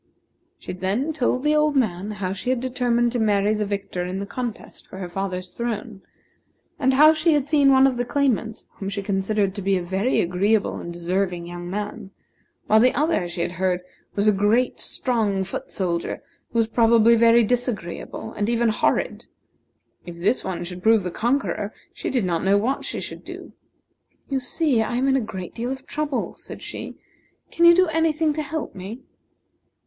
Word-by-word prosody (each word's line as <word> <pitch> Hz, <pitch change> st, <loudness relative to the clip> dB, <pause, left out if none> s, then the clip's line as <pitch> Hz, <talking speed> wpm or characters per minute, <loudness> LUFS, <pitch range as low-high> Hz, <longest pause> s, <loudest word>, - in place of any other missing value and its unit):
She -, -, -7 dB
then 200 Hz, -, -1 dB
told 255 Hz, -3 st, 0 dB
the 300 Hz, 0 st, +3 dB
old 300 Hz, -1 st, +2 dB
man 205 Hz, -6 st, 0 dB
how 200 Hz, -3 st, -3 dB
she 200 Hz, +6 st, -4 dB
had 255 Hz, -1 st, +1 dB
determined 245 Hz, -1 st, +1 dB
to 245 Hz, -, -1 dB
marry 210 Hz, -1 st, +2 dB
the 210 Hz, -1 st, -1 dB
victor 200 Hz, -3 st, -3 dB
in 180 Hz, +1 st, -4 dB
the 200 Hz, -, -3 dB
contest 240 Hz, +2 st, -6 dB
for -, -, -10 dB
her 185 Hz, -2 st, -5 dB
father's 185 Hz, 0 st, -4 dB
throne, 225 Hz, -3 st, -4 dB, 0.8 s
and 265 Hz, -2 st, +3 dB
how 305 Hz, +3 st, +8 dB
she 315 Hz, +1 st, +2 dB
had 290 Hz, -2 st, +1 dB
seen 290 Hz, -2 st, +4 dB
one 265 Hz, 0 st, +6 dB
for 260 Hz, -, 0 dB
the 245 Hz, -, -1 dB
claimants 240 Hz, -5 st, -1 dB
whom 195 Hz, -, -4 dB
she 200 Hz, 0 st, -4 dB
considered 195 Hz, 0 st, 0 dB
to 200 Hz, -, -5 dB
be 195 Hz, 0 st, +2 dB
a 180 Hz, -, -3 dB
very 190 Hz, +8 st, 0 dB
agreeable 200 Hz, +5 st, +1 dB
and 170 Hz, -, -6 dB
deserving 175 Hz, +1 st, -2 dB
young 175 Hz, 0 st, -7 dB
man; 205 Hz, +1 st, -5 dB, 0.6 s
while 220 Hz, -, +5 dB
the 250 Hz, +3 st, +4 dB
other, 300 Hz, -, +1 dB
she 175 Hz, 0 st, -4 dB
had 170 Hz, -, -1 dB
heard, 180 Hz, 0 st, 0 dB, 0.3 s
was 205 Hz, +1 st, +1 dB
a -, -, +7 dB
great, 210 Hz, +5 st, +2 dB
strong 215 Hz, -6 st, 0 dB
foot 190 Hz, -, -6 dB
soldier, 170 Hz, -3 st, -2 dB, 0.3 s
who -, -, -3 dB
was 225 Hz, -1 st, +3 dB
probably 230 Hz, 0 st, +5 dB
very 230 Hz, +1 st, +5 dB
disagreeable, 235 Hz, -6 st, -3 dB
and 210 Hz, +1 st, -1 dB
even 235 Hz, -1 st, +2 dB
horrid. 215 Hz, -, 0 dB, 0.8 s
If 175 Hz, -1 st, -9 dB
this 190 Hz, +9 st, +1 dB
one 175 Hz, -2 st, -3 dB
should 180 Hz, +1 st, -7 dB
prove 220 Hz, 0 st, +4 dB
the 180 Hz, -, -3 dB
conqueror, 235 Hz, -2 st, -1 dB, 0.2 s
she 420 Hz, -, -4 dB
did 250 Hz, -7 st, 0 dB
not 170 Hz, -2 st, -1 dB
know 195 Hz, +1 st, +4 dB
what 250 Hz, +7 st, -1 dB
she -, -, -3 dB
should -, -, -7 dB
do. -, -, -10 dB, 0.8 s
"You 270 Hz, -, +1 dB
see, 260 Hz, -1 st, +1 dB
I 230 Hz, +2 st, -2 dB
am 260 Hz, +2 st, +1 dB
in 270 Hz, -, +3 dB
a 270 Hz, -, +2 dB
great 190 Hz, -5 st, -6 dB
deal 240 Hz, +2 st, -3 dB
of 265 Hz, 0 st, -6 dB
trouble," 300 Hz, -3 st, -2 dB
said -, -, -10 dB
she. -, -, -7 dB, 0.6 s
"Can 340 Hz, -, +3 dB
you 340 Hz, 0 st, +9 dB
do 370 Hz, +1 st, +5 dB
any 325 Hz, 0 st, +2 dB
thing 310 Hz, 0 st, 0 dB
to 310 Hz, -, -2 dB
help 300 Hz, +1 st, -4 dB
me?" 200 Hz, +6 st, -8 dB
220 Hz, 195 wpm, -23 LUFS, 190-255 Hz, 0.8 s, you